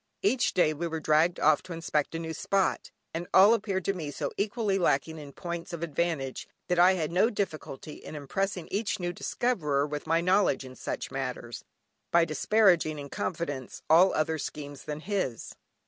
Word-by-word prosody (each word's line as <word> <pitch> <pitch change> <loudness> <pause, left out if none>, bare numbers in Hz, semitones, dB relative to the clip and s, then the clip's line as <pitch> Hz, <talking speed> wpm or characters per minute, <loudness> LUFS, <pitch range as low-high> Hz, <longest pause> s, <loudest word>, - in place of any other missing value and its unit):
Every 325 -9 +3 0.2
day 155 -4 +4
we 170 +3 -3
were 160 -1 -3
dragged 155 +3 +2
off 150 0 +4
to 180 - -8
inspect 165 -2 -1
a - - 0
new 165 0 -4
spot, 195 +5 0 0.2
and 170 +2 -4
all 200 +4 +8
appeared 200 -5 -1
to 195 - +1
me 160 -6 -5
so 145 - -3
equally 205 -1 0
lacking 160 -1 +1
in 145 -2 -9
points 170 +3 -6
of 170 0 -4
advantage, 155 -4 -2 0.2
that 180 -1 +2
I 180 +2 +7
had 165 -4 -2
no 190 +6 +4
difficulty 160 - -5
in - - -8
impressing 180 +5 -2
each 200 -2 -1
new 175 -1 -2
discoverer 155 - 0
with 150 +1 -5
my 165 +1 +3
knowledge 180 -5 +2
in 130 0 -10
such - - -5
matters, 125 -3 -5 0.5
by 170 -1 +4
disparaging 170 -1 +3
(in 140 -1 -7
confidence) 145 -8 -4
all 180 +4 +7
other 160 +1 0
schemes 145 -1 -7
than 150 0 -5
his. 185 - -3
165 Hz, 180 wpm, -28 LUFS, 150-185 Hz, 0.5 s, all